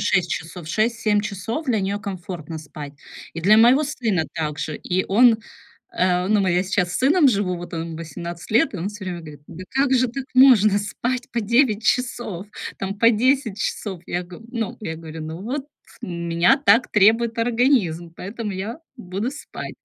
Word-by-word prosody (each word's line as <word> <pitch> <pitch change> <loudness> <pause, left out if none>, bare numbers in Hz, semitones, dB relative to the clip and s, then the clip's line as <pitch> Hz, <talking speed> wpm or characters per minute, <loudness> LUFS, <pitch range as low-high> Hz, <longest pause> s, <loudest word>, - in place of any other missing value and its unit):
6 175 -2 +1
часов. 165 0 -5
6-7 215 +1 +1
часов 210 - -4
для 225 -5 +1
неё 200 +2 -1
комфортно 180 -6 -6
спать. 145 -1 -9 0.4
И 165 - -4
для 210 +5 +5
моего 245 +6 +6
сына 230 - -1
также. 150 -1 -3
И 185 +1 -1
он, 225 +3 +5 0.6
э, 180 0 +2
ну, 210 -1 +3
мы 185 -2 +1
я 180 +1 +2
сейчас 185 -2 0
с - - -1
сыном 285 +3 +5
живу, 195 -5 0
вот, 175 0 -8
он 165 0 -4
18 170 +1 -7
лет, 240 +9 +3
и - - -2
он 180 +3 -3
всё 210 -1 -8
время 180 -2 -4
говорит: 150 -3 -11
"Да 185 +3 -9
как 270 0 +1
же 255 0 +3
так 260 +3 -5
можно 220 -6 +6
спать 245 +4 -3
по 235 - 0
9 225 0 +2
часов, 240 -7 -1 0.3
там, 195 +1 -4
по 230 +2 +6
10 240 -2 +1
часов?" 190 -5 -3
Я 175 - -2
г 175 0 -11
ну, 230 -3 -4
я 160 -6 -5
говорю: 160 0 -8
"Ну, 160 +3 -7
вот 270 +6 -4 0.4
у - - -5
меня 170 +4 +2
так 250 -3 +4
требует 225 +3 +4
организм, 230 - +1
поэтому 210 +2 -5
я 200 +8 -5 0.2
буду 200 +2 -4
спать". 295 - -8
200 Hz, 185 wpm, -22 LUFS, 175-235 Hz, 0.6 s, моего